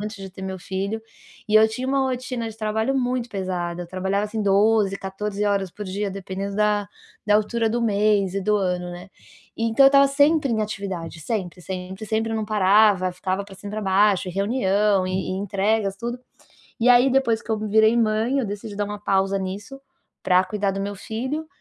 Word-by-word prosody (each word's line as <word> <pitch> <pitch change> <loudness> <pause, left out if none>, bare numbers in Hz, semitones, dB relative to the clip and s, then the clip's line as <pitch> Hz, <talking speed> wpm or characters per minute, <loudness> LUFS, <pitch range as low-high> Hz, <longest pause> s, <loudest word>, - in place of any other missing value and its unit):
antes 210 +1 -5
de 190 - -7
ter 190 - -11
meu 190 -1 -5
filho 200 +5 -3 0.5
e 215 - +5
eu 220 - +7
tinha 250 +4 -4
uma 275 +1 +1
rotina 255 -2 -3
de 220 - -10
trabalho 220 +4 -1
muito 250 -2 -1
pesada, 180 -3 -3
eu 175 - -9
trabalhava 190 +3 -1
assim 215 +1 -4
12, 200 0 +3
14 200 +2 -4
horas 200 -2 0
por 210 +4 -8
dia, 200 +2 -3
dependendo 195 +1 -5
da 210 -1 +1 0.4
da 210 - +4
altura 225 +1 0
do 240 +2 -1
mês 205 -3 +2
e 195 - -1
do 210 +2 +2
ano, 180 -2 -1
né. 180 +2 -10 0.5
Então 230 +4 +4
eu - - +10
estava 275 0 +6
sempre 285 -1 +3
em 220 - 0
atividade, 195 -6 -4
sempre, 180 -1 -4
sempre, 190 +2 -6
sempre, 220 +1 -1
não 220 - -1
parava, 205 -2 +4
ficava 185 +2 -3
pra 200 -1 -12
cima 200 +2 -9
e - - -9
pra 215 - -3
baixo, 195 0 +3
e - - -3
reunião, 200 -1 +1
e 185 0 -2
entregas, 200 +1 0
tudo, 240 +3 -4 0.6
e 235 - +2
aí 245 +2 +6
depois 245 -4 +2
que - - -9
eu 220 - +1
virei 220 +2 +3
mãe, 225 +4 +1
eu 265 - 0
decidi 205 0 -6
dar 205 - 0
uma 205 0 -6
pausa 195 -1 +1
nisso 200 +8 -6 0.4
pra 185 +1 +4
cuidar 200 +1 -1
do 195 - -4
meu 200 +1 -3
filho. 260 +10 -4
205 Hz, 200 wpm, -23 LUFS, 190-225 Hz, 0.6 s, eu